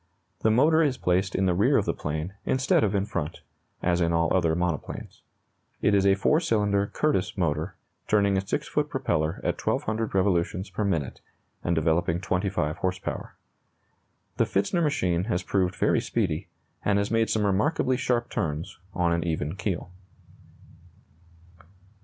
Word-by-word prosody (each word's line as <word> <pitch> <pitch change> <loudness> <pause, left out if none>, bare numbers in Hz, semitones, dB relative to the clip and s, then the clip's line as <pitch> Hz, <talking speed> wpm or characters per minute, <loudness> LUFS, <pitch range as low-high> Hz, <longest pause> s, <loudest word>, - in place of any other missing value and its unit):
The 110 - +2
motor 150 +8 +4
is 140 -5 +1
placed 95 +2 0
in 95 - +2
the 90 - +3
rear 95 +4 +3
of - - +1
the - - 0
plane, 80 +5 -4
instead 130 -3 +2
of 105 -1 +1
in 100 0 +1
front, 85 -7 -4 0.4
as 90 0 +2
in 85 0 +2
all 85 +1 +2
other 85 -3 +2
monoplanes. 85 -4 -3 0.6
It 100 - +2
is 100 -1 +4
a 95 - +5
4 150 +10 +3
cylinder 105 - +1
Curtiss 150 -11 0
motor, 80 0 -1 0.3
turning 100 -2 +3
a 95 - +2
6 95 - -3
foot - - -1
propeller 80 +3 -1
at - - -2
1,200 110 -1 -1
revolutions 95 0 +1
per 105 - -2
minute, 85 -9 -1 0.4
and 85 - +1
developing 80 +1 +1
25 90 -4 -1
horse 95 0 -1
power. - - -6 1.0
The - - +3
Pfitzner 100 - 0
machine 90 - +1
has 105 -5 -1
proved 95 -2 0
very - - +2
speedy, - - -1 0.4
and 100 -1 +2
has 100 +1 0
made 115 -1 +2
some 110 -2 +1
remarkably 130 +6 +1
sharp 120 -2 0
turns 80 +1 -3 0.2
on 85 -1 +2
an 85 -1 0
even 80 -1 -2
keel. 95 -2 -3
95 Hz, 160 wpm, -26 LUFS, 85-105 Hz, 1.0 s, a